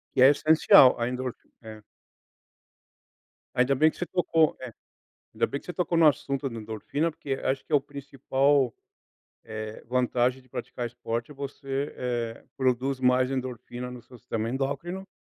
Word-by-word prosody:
Que - - +4
é 130 - +10
essencial 155 -2 +7
a - - -1
endor 125 0 -3 0.3
é. 110 -1 -10 1.7
Ainda 125 +2 +3
bem 155 +4 +4
que - - -18
você 180 - -2
tocou 165 -3 +2
é, 130 -2 -7 0.6
ainda - - +2
bem 140 - -4
que - - -21
você 180 - -4
tocou 175 -1 -1
no 165 -1 +6
assunto 140 -1 -1
da 115 -3 -7
endorfina, 110 +9 -2
porque 145 -3 -4
acho 135 0 -1
que - - -13
é - - +7
o - - +3
principal, 140 -1 0 0.7
eh, 110 -1 -7
vantagem 125 +1 +1
de 130 - -26
praticar 120 0 -5
esporte 120 +1 -4
é - - -10
você, 140 0 -4
eh, 120 -2 -3
produzir 130 +1 0
mais 125 0 +3
endorfina 125 -1 -5
no 125 -1 -9
seu 125 +2 -15
sistema 110 +1 -3
endócrino, 140 +9 -3
130 Hz, 165 wpm, -27 LUFS, 120-140 Hz, 1.7 s, é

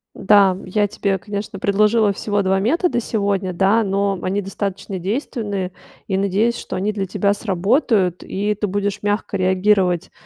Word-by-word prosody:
Да, 195 -2 +4
я 205 +2 +1
тебе, 200 -1 -1
конечно, 200 0 -6
предложила 210 +2 +3
всего 205 +1 -1
2 190 0 +1
метода 310 - +1
сегодня, 200 -4 -1
да, 195 +5 +3
но 200 0 0
они 195 +2 0
достаточно 195 0 -4
действенные. 200 - -3 0.3
И 195 - -1
надеюсь, 200 +5 +1
что - - -5
они 205 +3 -1
для 200 -2 -2
тебя 200 +1 +1
сработают, 200 - +1
и 205 +2 -2
ты 210 - -2
будешь 205 +1 -2
мягко 205 0 -1
реагировать 185 -1 +2
200 Hz, 150 wpm, -20 LUFS, 190-210 Hz, 0.3 s, Да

